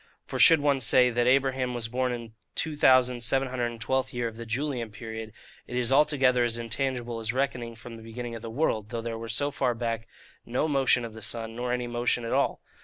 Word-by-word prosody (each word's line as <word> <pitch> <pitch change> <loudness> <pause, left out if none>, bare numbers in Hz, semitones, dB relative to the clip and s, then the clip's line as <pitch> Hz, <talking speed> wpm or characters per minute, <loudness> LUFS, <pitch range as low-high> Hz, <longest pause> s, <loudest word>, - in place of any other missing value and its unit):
For - - -5
should 165 -3 +8
one 140 -2 +2
say, 125 +1 +5
that 120 +1 +1
Abraham 130 -1 +2
was 115 -2 -2
born 125 +2 -1
in 120 -1 -3
the 115 - -13 0.2
two 155 -1 -1
thousand 125 -3 +4
seven 135 +3 +1
hundred 125 -1 -1
and 120 -1 -7
twelfth 130 +3 -1
year 120 -1 -1
of 115 - -7
the 115 0 -8
Julian 125 -1 -2
period, 110 0 -7 0.4
it 125 - -4
is 125 0 0
altogether 135 -4 +4
as 120 -1 0
intelligible 120 0 -2
as 110 0 -2
reckoning 125 -3 -2
from 115 0 -10
the - - -12
beginning 120 +1 -6
of 115 - -7
the 115 - -6
world, 110 -4 -1
though 115 -1 -3
there 115 -1 -4
were 115 0 -7
so 145 +4 0
far 125 -4 0
back 115 -1 -3 0.4
no 125 +6 -1
motion 135 -4 +2
of 115 - -8
the 110 - -10
sun, 115 -1 -3
nor 120 +1 -2
any 125 0 -1
motion 120 0 0
at 115 - -2
all. - - +1
120 Hz, 235 wpm, -27 LUFS, 115-130 Hz, 0.4 s, should